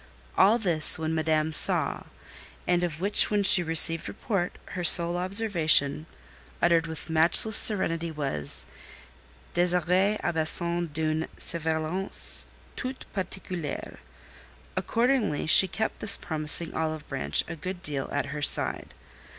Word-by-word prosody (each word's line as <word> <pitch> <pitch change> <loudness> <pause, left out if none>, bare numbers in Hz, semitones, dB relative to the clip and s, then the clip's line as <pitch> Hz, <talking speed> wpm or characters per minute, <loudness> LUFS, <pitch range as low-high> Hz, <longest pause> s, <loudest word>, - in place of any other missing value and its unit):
All 205 +5 +2
this 170 -9 +5
when 160 0 -5
Madame 160 0 -3
saw, - - +3 0.6
and 175 0 -2
of 165 -3 -6
which 200 +3 0
when 210 -1 -2
she 195 -1 +6
received 165 0 +5
report, 190 -6 -6
her 180 -1 -8
sole 170 +1 +7
observation, 175 -6 0 0.5
uttered 170 -1 0
with 160 -1 -10
matchless 165 +7 +2
serenity, 170 -6 +2
was: 135 - -1 0.9
"Désirée 180 +3 -1
a 175 - -3
besoin 170 +2 0
d'une 155 +1 -4
surveillance 160 +3 -5 0.3
toute 255 0 -9
particulière." 185 -5 -8 0.8
Accordingly 235 - -3
she 180 +4 +5
kept 220 +5 -6
this 200 - +6
promising 155 +1 -1
olive 155 -1 -6
branch 70 +1 -2
a 165 - -9
good 185 +3 -9
deal 140 -5 -6
at - - -4
her 150 - -8
side. 140 - 0
170 Hz, 125 wpm, -24 LUFS, 155-190 Hz, 0.9 s, sole